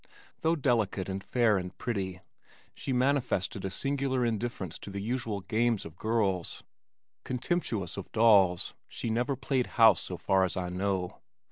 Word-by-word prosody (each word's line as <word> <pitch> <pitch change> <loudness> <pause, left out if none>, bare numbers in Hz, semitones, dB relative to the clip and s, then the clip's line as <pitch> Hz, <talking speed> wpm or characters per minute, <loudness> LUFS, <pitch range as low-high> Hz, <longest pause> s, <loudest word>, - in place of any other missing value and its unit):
Though 165 +1 +2
delicate 115 - +1
and 95 0 -4
fair 115 -5 +3
and 90 +1 -7
pretty, 95 -6 -3 0.5
she - - -5
manifested 125 -7 +1
a 95 - -1
singular 135 +2 0
indifference 110 -6 -3
to - - -9
the 100 0 -5
usual 110 -1 -2
games 115 +1 0
of 80 - -9
girls. 100 -4 -1 0.6
Contemptuous 120 - -2
of 100 - -7
dolls, 100 -6 +4
she 115 - -4
never 120 +4 0
played 130 -1 0
house 115 -1 +7
so - - -6
far 95 -1 +2
as 95 0 -1
I 90 -1 -2
know. 95 0 -2
110 Hz, 150 wpm, -30 LUFS, 95-125 Hz, 0.6 s, house